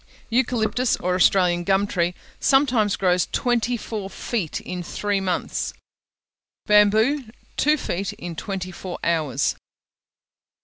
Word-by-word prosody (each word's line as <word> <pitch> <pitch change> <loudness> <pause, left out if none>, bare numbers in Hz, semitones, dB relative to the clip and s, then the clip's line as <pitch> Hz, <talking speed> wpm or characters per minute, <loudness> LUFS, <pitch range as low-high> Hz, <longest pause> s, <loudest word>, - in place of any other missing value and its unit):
Eucalyptus, 245 0 +1
or 180 +1 -1
Australian 180 -1 +3
gum 195 +2 +2
tree, 175 -3 -1 0.2
sometimes 255 -7 +3
grows 180 -2 +2
twenty 240 0 +1
four 210 -3 -5
feet 200 -6 -3
in 180 -1 -6
three 205 +3 -1
months: 185 -2 -2 0.9
bamboo, 220 +7 +4 0.3
two 300 +1 +3
feet 195 -7 -3
in 175 -1 -7
twenty 185 +1 -4
four 180 0 -7
hours. 155 -6 +1
200 Hz, 115 wpm, -23 LUFS, 180-235 Hz, 0.9 s, bamboo